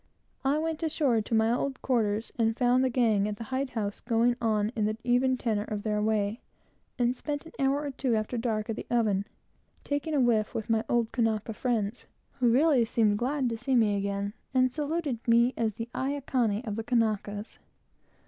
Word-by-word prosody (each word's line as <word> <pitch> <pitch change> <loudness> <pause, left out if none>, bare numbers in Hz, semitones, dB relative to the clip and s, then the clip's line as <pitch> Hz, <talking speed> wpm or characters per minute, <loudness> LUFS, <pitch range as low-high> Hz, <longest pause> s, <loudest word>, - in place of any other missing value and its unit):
I 275 +2 +2
went 320 0 -2
ashore 290 -8 +1
to 225 - -2
my 220 +1 +3
old 265 +2 -2
quarters, 225 -4 0
and 225 -1 +1
found 250 0 +3
the 260 - +2
gang 225 -5 +2
at 210 - -3
the 230 - -7
hide 260 +3 -2
house 210 -4 -3
going 235 +1 +2
on 215 -2 +1
in 215 - +1
the 215 +1 -1
even 250 +1 +2
tenor 215 -4 -1
of 210 -1 -4
their 210 -1 0
way, 215 +1 0 0.6
and 245 0 +1
spent 290 +3 -4
an 325 - -11
hour 275 +1 +2
or 285 - -3
two, 255 -3 0
after 215 +3 -2
dark, 225 -3 -1
at 220 - -5
the - - -6
oven, 210 -5 +1 0.6
taking 290 +2 -2
a - - +3
whiff 230 -4 +2
with 225 0 -2
my 225 0 +2
old 235 -2 +1
Kanaka 225 -2 0
friends, 225 -1 -2 0.3
who 245 -2 +4
really 270 +1 +4
seemed 220 -2 +1
glad 265 +1 0
to 230 - -3
see 255 +3 0
me 215 -4 +3
again, 200 0 -2 0.2
and 255 -1 +3
saluted 300 -4 -2
me 235 +2 +4
as 220 -3 -1
the 230 - -5
Aikane 260 -5 -1
of 210 -1 -4
the 225 - -2
Kanakas. 215 -3 -1
235 Hz, 195 wpm, -28 LUFS, 215-260 Hz, 0.6 s, who